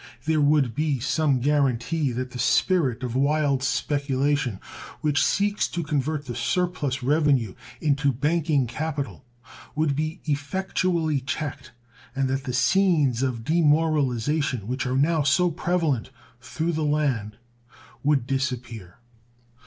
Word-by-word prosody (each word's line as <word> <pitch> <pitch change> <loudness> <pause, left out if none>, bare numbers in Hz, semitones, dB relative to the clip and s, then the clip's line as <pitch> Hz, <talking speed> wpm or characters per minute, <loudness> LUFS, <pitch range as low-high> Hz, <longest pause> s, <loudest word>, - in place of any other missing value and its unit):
There 160 -1 +2
would 145 -4 +3
be 150 0 0
some 140 +1 +1
guaranty 140 +1 +1
that 125 +1 -4
the 125 - -7
spirit 135 -10 +2
of 125 -2 -3
wild 140 0 +2
speculation 140 -4 0 0.4
which 150 -1 +2
seeks 205 +1 +1
to 170 - -4
convert 150 0 -2
the 125 - -5
surplus 145 +1 -1
revenue 140 -7 +2 0.3
into 145 -2 +2
banking 150 +1 +1
capital 140 +2 -4 0.5
would 150 -2 +1
be 155 +4 -2
effectually 160 +1 0
checked, 140 -1 -5 0.4
and 135 0 +1
that 135 +1 -2
the 130 - -2
scenes 140 -1 +3
of 125 -4 -1
demoralization 150 - +1
which 130 +2 -2
are 130 +1 0
now 155 +3 +2
so 170 +5 +3
prevalent 165 -7 -1 0.3
through 130 +7 -3
the 155 0 -1
land 135 -8 0 0.7
would 140 -4 +2
disappear. 125 -8 -4
145 Hz, 125 wpm, -25 LUFS, 130-155 Hz, 0.7 s, would